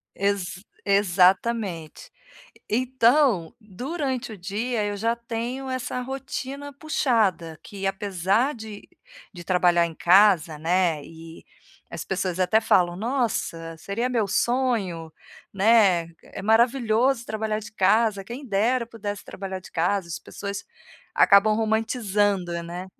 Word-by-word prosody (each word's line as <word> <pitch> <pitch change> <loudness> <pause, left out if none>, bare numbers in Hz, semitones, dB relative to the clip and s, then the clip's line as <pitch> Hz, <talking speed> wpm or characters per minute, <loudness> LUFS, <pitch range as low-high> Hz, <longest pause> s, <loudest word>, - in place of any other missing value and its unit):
Ex 195 -2 -2 0.2
exatamente. 195 -2 +1 0.6
Então, 245 - +2
durante 255 - -4
o 210 - -10
dia, 210 +5 -2
eu 205 0 -2
já 230 +3 0
tenho 235 +3 -5
essa 255 -1 -3
rotina 270 +2 -6
puxada, 225 - 0
que 195 -1 -6
apesar 195 - 0
de 220 -2 -10 0.4
de 175 -3 -10
trabalhar 175 -1 +3
em 165 - -8
casa, 175 -3 +4
né, 165 -1 +1
e 165 0 -12 0.5
as - - -6
pessoas 185 -1 -2
até 185 +5 +3
falam: 175 -5 +2
"Nossa, 210 -8 -2
seria 210 +9 -2
meu 235 -4 0
sonho, 200 -8 0 0.4
né. 195 -5 +4
É - - -10
maravilhoso 235 +2 +2
trabalhar 215 0 -2
de 215 - -11
casa, 210 0 +2
quem 245 +7 -8
dera 235 +3 +1
pudesse 205 -3 -6
trabalhar 190 -1 -6
de - - -14
casa", 175 +2 0
as 165 - -5
pessoas 200 0 -7 0.5
acabam 205 +2 +5
romantizando, 210 -4 0
né. 175 +2 -7
205 Hz, 120 wpm, -24 LUFS, 185-235 Hz, 0.6 s, acabam